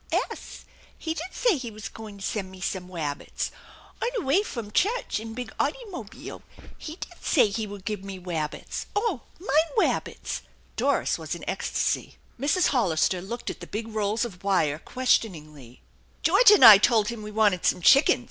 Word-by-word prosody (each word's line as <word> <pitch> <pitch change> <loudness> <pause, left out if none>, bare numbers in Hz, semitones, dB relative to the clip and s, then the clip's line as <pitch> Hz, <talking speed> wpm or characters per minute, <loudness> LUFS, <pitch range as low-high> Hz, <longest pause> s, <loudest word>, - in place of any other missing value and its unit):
" - - -21 0.2
'Es. - - -10 0.3
He 320 - -3
did 335 +3 -6
say 465 -9 +2
he 250 -3 -5
was 215 0 -8
goin' 215 -2 -10
to 195 - -6
sen' 195 -4 -3
me 190 0 -12
some 180 0 -3
wabbits. 155 -6 -4 0.5
On 470 - +1
'e - - -4
way 285 +9 +4
fum 235 - -6
chutch 435 - 0
in 225 0 -8
big 245 -2 -6
oughtymobeel. 390 - -4 0.3
He 310 - -8
did 350 -1 -10
say 255 -9 +4
he 215 +1 -3
would 200 -1 -10
give 210 -2 -3
me 195 -1 -7
wabbits. 165 -4 -4
Oh, 410 - 0 0.2
mine 325 -3 +1
wabbits! - - -1 0.2
" - - -33
Doris - - +1
was - - -4
in - - -10
ecstasy. - - -1 0.2
;Mrs. 295 +7 +2
Hollister 185 - +1
looked 235 +6 -5
at - - -11
the - - -9
big 225 +2 -5
rolls 215 +1 0
of 190 -6 -10
wire 160 -7 +1
questioningly; 155 - -2 0.2
" - - -34
George - - +6
and 415 - +8
I 210 -3 +12
told 220 -1 +3
him 235 -2 -5
we 210 - -7
wanted 210 -4 +2
some - - +2
chickens. 275 - +6
220 Hz, 185 wpm, -26 LUFS, 190-280 Hz, 0.5 s, I